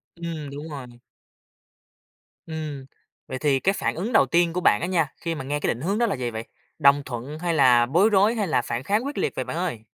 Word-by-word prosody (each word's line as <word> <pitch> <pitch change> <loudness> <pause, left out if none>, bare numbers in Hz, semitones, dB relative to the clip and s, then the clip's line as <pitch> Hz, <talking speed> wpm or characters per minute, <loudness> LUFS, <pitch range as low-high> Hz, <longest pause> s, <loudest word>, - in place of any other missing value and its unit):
Ừm, 165 -4 -6
đúng 145 +3 -7
rồi. 140 -4 -7 1.6
Ừm, 155 -4 -5 0.4
vậy 130 - -4
thì 140 -3 +2
cái 195 +6 +2
phản - - -1
ứng 215 +8 -3
đầu 140 - +6
tiên 170 +5 +2
của 180 - -1
bạn 105 -7 +4
á 175 - -1
nha 165 -6 0
khi 165 -1 -2
mà 135 - -5
nghe 145 +2 -2
cái - - -2
định 120 - -10
hướng 195 +5 0
đó 235 - +3
là 200 - -1
gì 125 -2 -3
vậy? 110 0 -5 0.4
Đồng 140 -1 +5
thuận 130 +5 -6
hay 170 0 -1
là 125 -5 +5
bối 175 - +3
rối, 210 +3 +4
hay 210 -3 -1
là 155 - +2
phản 120 +1 -4
kháng 210 - 0
quyết 285 - -5
liệt - - -1
vậy 130 - -2
bạn - - -4
ơi? 120 -11 -3
155 Hz, 240 wpm, -24 LUFS, 135-180 Hz, 1.6 s, đầu